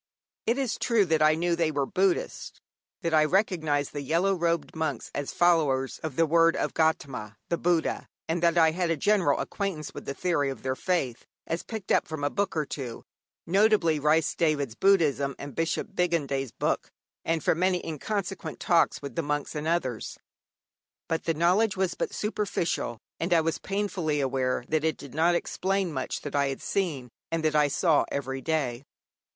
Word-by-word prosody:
It 235 +3 +2
is 265 -5 -1
true 230 -4 +3
that 160 -2 +1
I 155 0 +5
knew 170 +1 +1
they 165 -2 +1
were 145 -3 0
Buddhists, 190 +4 -1 0.4
that 165 -2 -1
I 155 -1 +6
recognized 155 -5 +1
the 145 - -3
yellow 170 +8 +2
robed 170 -3 -1
monks 160 0 -3
as 145 -1 -3
followers 150 -7 +2
of 155 -4 -5
the 165 - +4
word 165 +1 +4
of - - -1
Gaudama 135 -9 0
the 170 - +1
Buddha, 170 -2 0 0.2
and 165 +1 -1
that 170 0 +3
I 160 -1 +6
had 175 +1 -1
a 165 - +1
general 185 -4 +2
acquaintance 190 -7 -3
with - - -8
the 140 - -4
theory 165 -6 +1
of 135 - -7
their 130 0 -1
faith 135 -8 -1 0.2
as 165 +1 -2
picked 220 -4 -6
up - - +3
from 155 -3 -5
a 145 - +1
book 200 -4 -1
or 155 - +1
two 130 -5 -6 0.4
notably, 190 -4 +3
Rhys 150 +2 +2
Davids' 150 -7 0
'Buddhism' 145 -6 +2
and 140 0 -8
Bishop 165 +5 -2
Bigandet's 140 - 0
book - - -1 0.3
and 165 -1 0
from 160 - +2
many 185 0 +1
inconsequent 195 +5 -4
talks 170 -4 +2
with 140 -3 -6
the - - +1
monks 145 -1 -2
and 150 +1 -3
others. 130 -9 -1 0.9
But 165 - -2
the 165 - +1
knowledge 185 +6 +2
was 185 -2 +1
but - - -3
superficial, 200 - -2 0.2
and 170 +3 -2
I 170 -2 +5
was 165 0 -1
painfully 190 -7 -1
aware 130 -2 0
that 155 -1 0
it 160 0 0
did 140 - -11
not 165 +3 +3
explain 190 0 -1
much 130 -2 -3
that 145 - -5
I 140 -1 +3
had 135 -1 -4
seen 155 -11 -1 0.2
and 165 -1 -1
that 155 -1 +2
I 150 -1 +5
saw 155 +2 +2
every 135 -1 -3
day. 135 -6 -1
160 Hz, 185 wpm, -27 LUFS, 145-175 Hz, 0.9 s, I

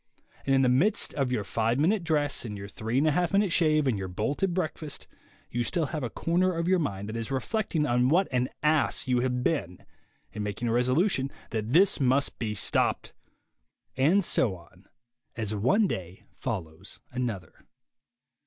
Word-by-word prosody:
And 135 - +4
in 135 - +4
the - - +4
midst 165 - +2
of 135 -3 -1
your 115 -5 0
five 115 +5 0
minute 185 +6 +2
dress, 150 -3 0
and 105 -4 -6
your 100 0 -7
three 110 +4 -3
and 145 - +3
a 155 - +4
half 175 +3 0
minute 200 -2 +3
shave, 155 -3 +3
and 120 -7 +1
your 95 - -4
bolted 140 - -1
breakfast, 160 -4 -4 0.4
you 120 0 0
still 165 +5 0
have 155 - -2
a 125 - -2
corner 180 - +1
of 170 +1 -1
your 185 0 +3
mind 100 - -3
that 110 - -5
is 115 +1 -4
reflecting 155 - -1
on' 125 -1 +2
what 180 +6 +3
an 125 0 0
ass 150 -2 +2
you 125 -1 +2
have 125 0 -1
been, 90 - -2 0.5
and 105 - -4
making 105 +3 -3
a - - +1
resolution 135 - +2 0.2
that 110 -2 -2
this 190 +4 +5
must 135 +1 +1
be 110 -2 -2
stopped. 100 - 0 0.8
And 170 +9 +3
so 110 - +1
on, 90 +2 -18 0.5
as 110 -2 -3
one 130 - +3
day 95 - -5
follows 95 -5 -6
another. 115 -10 -5
130 Hz, 180 wpm, -28 LUFS, 110-160 Hz, 0.8 s, this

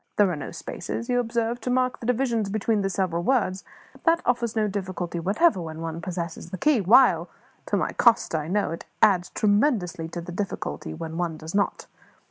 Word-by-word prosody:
There 205 -3 +4
are - - -2
no 145 - -6
spaces, 230 +7 -6
you 245 0 +2
observe, 235 0 -1
to - - -3
mark 255 0 +1
the 230 - -6
divisions 235 -4 +1
between 215 +1 0
the 195 - 0
several 185 -3 -1
words; 195 -4 +1 0.3
but - - -20
that 335 0 +4
offers 235 -2 0
no 215 -1 +2
difficulty 185 -4 -4
whatever 195 - +2
when 160 -1 -6
one 165 0 -4
possesses 170 -3 -5
the 185 - -5
key; 285 - +3
while 185 -4 +5 0.4
to - - +1
my - - -1
cost 235 -7 +3
I 155 -1 -1
know 200 +2 0
it 165 - -5
it - - -13 0.2
adds 190 -5 +4
tremendously 205 - +1
to 170 +1 -6
the 170 - -8
difficulty 170 - -4
when 165 - -6
one 170 -3 -2
does 160 +1 -8
not. 200 0 0
195 Hz, 205 wpm, -25 LUFS, 170-235 Hz, 0.4 s, while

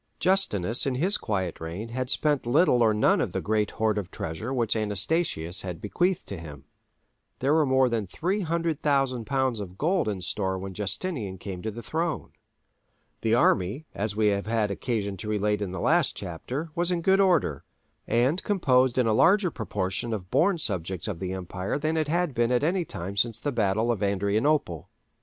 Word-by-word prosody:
Justinus 125 - +2
in 130 - 0
his 180 +10 +1
quiet 95 -6 -2
reign 85 +8 -5
had 130 +1 -3
spent 145 -4 +1
little 135 -1 +4
or 110 -2 +5
none 105 0 +3
of - - -2
the - - 0
great 105 -1 0
hoard 110 -1 +1
of 95 -3 -6
treasure 90 +8 -5
which 120 -5 0
Anastasius 105 - 0
had 90 -3 -6
bequeathed 175 - 0
to 100 - -5
him. 75 -4 -10 0.7
There 135 +3 +1
were 155 -2 +3
more 130 0 +4
than 115 -4 -1
300,000 155 - 0
lbs. 130 -3 0
of 95 -2 -8
gold 175 - +1
[£13,400,000] - - +1
in 95 - -7
store 95 +1 -1
when 95 +1 -6
Justinian 105 - -3
came 95 -1 -7
to 110 - -3
the 115 +2 -8
throne. 165 0 -2 0.9
The 115 0 +2
army, 105 - +2
as 105 0 -2
we 105 -1 +3
have 100 0 -1
had 110 -2 +1
occasion 100 -3 -2
to 105 - -6
relate 105 0 0
in 100 -3 -3
the 95 - -5
last 165 -3 +2
chapter, 125 - -5
was 175 +2 0
in 175 -2 -1
good 190 +2 +4
order, 170 - +2 0.4
and 130 +9 +2
composed 130 - +2
in 125 - +3
a 110 - +2
larger 180 - +4
proportion 105 -1 -2
of 90 -3 -8
born 190 +2 +3
subjects 95 - -3
of 100 -6 -4
the 95 0 -3
empire 95 +3 -3
than 155 +2 -1
it 155 -2 0
had 170 -1 0
been 120 0 +1
at 125 +2 +2
any 175 +2 +1
time 95 - -6
since 110 +2 0
the 145 - -2
battle 110 0 +1
of 115 - -2
Adrianople. 100 - 0
115 Hz, 190 wpm, -27 LUFS, 100-150 Hz, 0.9 s, or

